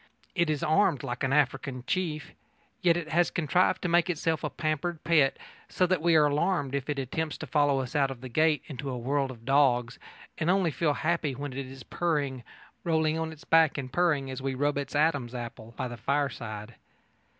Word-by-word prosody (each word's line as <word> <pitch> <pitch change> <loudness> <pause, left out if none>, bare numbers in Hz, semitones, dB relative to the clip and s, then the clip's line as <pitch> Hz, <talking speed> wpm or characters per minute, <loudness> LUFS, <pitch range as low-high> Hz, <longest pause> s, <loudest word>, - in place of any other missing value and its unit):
It 170 -3 +1
is 155 +1 -1
armed 165 - +2
like 120 +2 -4
an 135 - +1
African 135 -2 0
chief. 160 -3 -2 0.5
Yet 170 -1 +4
it 165 -3 -4
has 170 +2 +3
contrived 170 +3 +1
to - - +1
make 175 +1 +3
itself 165 -1 -1
a - - -1
pampered 155 +1 -2
pet, 155 -5 +3 0.3
so 185 - +2
that 180 -3 +1
we 170 0 +3
are 155 -1 +6
alarmed 145 -1 0
if 140 +1 -2
it 145 - -1
attempts 150 +4 -3
to - - -6
follow 145 -3 +2
us 130 +3 -7
out 140 -2 +3
of 130 -3 -8
the 130 - -6
gate 155 +5 +2
into 140 -1 -6
a 125 - -3
world 135 +3 0
of 115 -3 -11
dogs, 125 -3 +2 0.4
and 165 0 0
only 185 -3 +3
feel 150 +2 +1
happy 155 -4 0
when 140 0 -5
it 135 0 -5
is 130 -1 -10
purring 145 -7 -1 0.4
rolling 160 -1 +1
on 160 0 -2
its 155 -1 -12
back 165 -2 +4
and 130 -2 -5
purring 150 -7 +1
as 130 0 -6
we 135 0 -2
rub 145 +2 +1
its 140 +1 -5
Adam's 145 -5 +1
apple 115 -1 -7
by - - -2
the 120 -1 -7
fireside. 120 -4 -2
145 Hz, 205 wpm, -28 LUFS, 130-160 Hz, 0.5 s, are